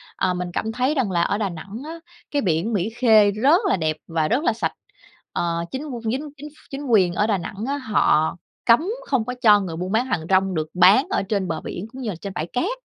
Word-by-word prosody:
à, 180 - 0
mình 180 0 -3
cảm 220 - -2
thấy 255 +6 0
rằng 235 -8 0
là 170 -1 +1
ở 200 - 0
Đà 205 -3 -1
Nẵng 195 +8 -8
á, 330 +1 -7 0.3
cái 290 - +1
biển 185 +5 0
Mỹ 200 +2 0
Khê 220 -4 +5
rất 280 - +3
là - - +2
đẹp 155 -2 -1
và 160 -2 0
rất 265 +7 +1
là 235 - +2
sạch. 170 -8 -2 0.6
Ờ, 170 0 -1
chính 265 +3 -4
qu 245 -5 -6
chính 290 +4 -3
chính 300 +2 -8
ph 300 - -23
chính 280 +1 -5
quyền 190 -8 +3
ở 210 +4 +1
Đà 205 -3 +2
Nẵng 195 +5 -6
á 285 +1 -1
họ 190 - +2 0.3
cấm 230 0 +6 0.3
không 255 -6 +1
có 250 - -3
cho 210 -3 +7
người 180 -4 -4
buôn 180 +3 -4
bán 230 +4 +2
hàng 165 -11 -2
rong 190 -1 +2
được 155 0 -1
bán 205 - +5
ở 390 - 0
trên 195 -2 -1
bờ 160 - -3
biển 200 +5 -6
cũng 265 - -8
như 230 - -3
là 185 - -4
trên 195 +3 -7
bãi 160 -1 -3
cát, 255 - -1
210 Hz, 255 wpm, -22 LUFS, 180-255 Hz, 0.6 s, cho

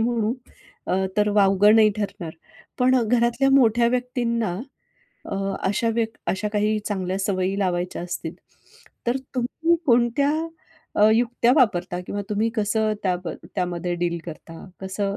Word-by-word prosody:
म्हणू. 230 -1 +1 0.5
अ, - - -1 0.2
तर 210 0 +3
वावगं 205 +1 +5
नाही 215 -1 +6
ठरणार. 200 -5 -4 0.5
पण 255 +1 +4
घरातल्या 240 +3 +2
मोठ्या 240 -3 +4
व्यक्तींना 235 -6 -1 0.7
अ, - - -2 0.3
अशा 205 +4 0
व्यक् 225 -1 -1
अशा 210 +2 -1
काही 215 +1 +1
चांगल्या 190 -2 -2
सवयी 190 0 -1
लावायच्या 180 -2 -1
असतील, 175 -2 -5 0.7
तर 240 +2 +2 0.2
तुम्ही 320 +7 +1
कोणत्या 240 +3 +3 0.6
अ, 210 +1 +5
युक्त्या 240 +1 +2
वापरता? 180 - +2
किंवा 205 - -3
तुम्ही 210 +2 +1
कसं 215 0 +1
त्याम 180 -2 -1 0.3
त्यामध्ये 180 -1 -2
डील 170 0 -1
करता? 165 0 -9 0.2
कसं 195 +1 -3
210 Hz, 130 wpm, -23 LUFS, 185-235 Hz, 0.7 s, नाही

